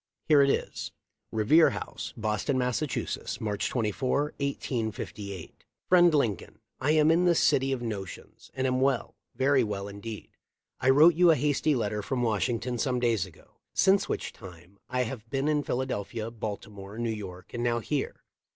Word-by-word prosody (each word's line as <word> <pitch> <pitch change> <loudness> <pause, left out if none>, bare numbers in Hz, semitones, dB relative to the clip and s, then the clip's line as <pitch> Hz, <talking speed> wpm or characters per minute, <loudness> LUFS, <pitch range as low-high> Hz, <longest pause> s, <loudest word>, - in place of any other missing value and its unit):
Here 150 -2 +5
it 140 - +4
is: - - -2 0.4
"Revere 130 +10 +5
House, - - -6
"Boston, 110 +4 -1
Mass., 125 -3 0 0.6
March 105 -2 -2
24, 125 +4 0 0.2
1858. 110 - -4 0.3
"Friend 175 -1 +6
Lincoln. 105 - -1 0.2
"I 145 +4 +2
am 155 0 +5
in 175 +2 +3
this 170 -2 +4
city 135 +1 +3
of 130 -2 -2
notions, 100 -5 -7
and 130 0 -1
am 130 0 +1
well 135 -2 +1
— - - -49
very 140 -2 +4
well 100 -2 -3
indeed. 100 +2 -8 0.5
I 130 - +2
wrote 155 +6 +7
you 175 +2 +5
a 160 - +6
hasty 145 +2 +1
letter 105 -3 -1
from 125 +4 -2
Washington 120 +2 -1
some 125 +1 0
days 115 -6 +1
ago, 85 - -20 0.2
since 195 +1 +4
which - - -3
time 90 0 -13
I 125 0 +1
have 115 -2 -7
been 135 +3 -1
in 150 -1 +2
Philadelphia, 120 -4 -3
Baltimore, 105 -2 -7
New 115 -1 -1
York, 95 -4 -8
and 120 0 -3
now 120 -1 +1
here. 135 +4 -3
120 Hz, 165 wpm, -28 LUFS, 105-140 Hz, 0.6 s, wrote